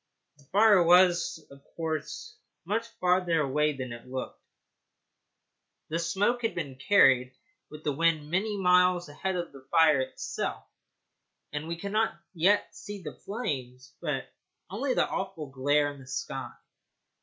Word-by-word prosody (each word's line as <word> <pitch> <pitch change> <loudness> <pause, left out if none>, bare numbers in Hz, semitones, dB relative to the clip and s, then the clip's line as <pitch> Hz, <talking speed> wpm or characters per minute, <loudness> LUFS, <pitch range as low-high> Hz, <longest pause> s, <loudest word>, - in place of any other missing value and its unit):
The 140 - -21
fire 205 +3 +5
was, 175 -2 +4
of 140 0 -15
course, 160 -2 -4 0.3
much 220 +5 -1
further 180 -2 +2
away 150 +2 +1
than 130 -2 -5
it 120 +1 -11
looked; 130 0 -6 1.5
the 165 +2 -1
smoke 200 +9 +1
had 225 - -1
been 145 -6 -4
carried 130 -5 +4 0.3
with 150 0 -11
the 150 - 0
wind 155 0 +1
many 205 +3 0
miles 180 -2 +4
ahead 185 +6 -3
of 175 -1 -3
the 135 -1 -15
fire 160 -4 +5
itself, 130 - -4 0.9
and 150 +2 -4
we 170 0 -4
could 200 +4 -5
not 220 +1 0
yet 190 +4 +2
see 205 -2 -8
the 150 - -6
flames, 140 - -5
but 150 -5 -2 0.5
only 255 +6 -1
the - - +2
awful 175 -7 -4
glare 145 +2 +1
in 140 - -14
the 130 - -14
sky. 130 - -4
165 Hz, 145 wpm, -28 LUFS, 145-190 Hz, 1.5 s, fire